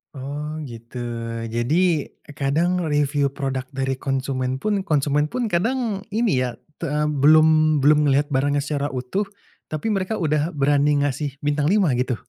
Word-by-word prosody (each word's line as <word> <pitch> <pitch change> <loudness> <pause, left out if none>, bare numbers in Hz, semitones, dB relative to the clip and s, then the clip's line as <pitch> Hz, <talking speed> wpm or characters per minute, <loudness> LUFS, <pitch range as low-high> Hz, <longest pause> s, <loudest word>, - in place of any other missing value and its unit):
Oh, 150 +3 -5
gitu. 120 -1 -8 0.5
Jadi, 150 +7 +1 0.3
kadang 165 +6 +1
reviu 145 -1 +1
produk 135 -1 -4
dari 135 -1 -1
konsumen 130 -1 -1
pun, 205 +9 -1
konsumen 150 0 +2
pun 235 +5 -3
kadang, 215 +2 -1
ini 215 - +1
ya, 125 -1 -2 0.2
te 165 - -3
eee, 150 +1 0
belum 155 +1 +4
belum 150 +1 +5
ngelihat 145 +2 +2
barangnya 140 +1 +1
secara 145 -1 -2
utuh, 130 +12 -2 0.4
tapi 155 +9 -2
mereka 195 +1 -1
udah 155 -2 0
berani 145 0 +2
ngasih 145 0 -2
bintang 145 0 +1
5 190 -3 +3
gitu? 125 0 0
145 Hz, 145 wpm, -22 LUFS, 135-160 Hz, 0.5 s, belum